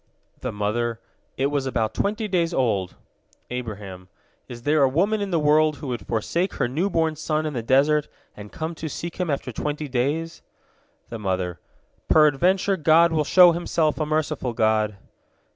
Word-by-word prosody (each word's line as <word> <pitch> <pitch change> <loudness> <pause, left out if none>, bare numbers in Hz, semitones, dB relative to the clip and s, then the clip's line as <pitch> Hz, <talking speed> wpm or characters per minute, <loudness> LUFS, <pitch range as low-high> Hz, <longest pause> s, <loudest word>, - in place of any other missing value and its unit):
The - - -4
mother: 115 +3 -2 0.4
"It 135 +2 0
was 140 -2 -1
about 115 -4 -1
twenty 215 +2 -1
days 175 -3 0
old." 105 -8 0 0.6
Abraham: 100 -7 -6 0.4
"Is 120 -1 -10
there 150 +2 +2
a 135 - +5
woman 200 +10 +1
in 200 - -2
the 175 - +1
world 155 0 +3
who 145 - -7
would 120 -6 -5
forsake 165 - -1
her - - 0
new 160 +11 -1
born 160 -3 0
son 155 0 -2
in 155 - -3
the 120 - -2
desert, 140 +5 +3 0.3
and 105 0 -11
come 160 +1 -4
to 160 -1 -6
seek 170 +3 -6
him 180 -3 -2
after 140 -3 -2
twenty 150 +5 -4
days?" 145 +6 -2 0.7
The 115 - -6
mother: 90 -3 -2 0.5
"Peradventure 180 +6 +3
God 165 +1 +4
will 155 -1 +1
show 180 +3 +7
Himself 165 -2 0
a 155 - 0
merciful 155 -5 -1
God!" 110 -2 +1
150 Hz, 170 wpm, -23 LUFS, 120-165 Hz, 0.7 s, show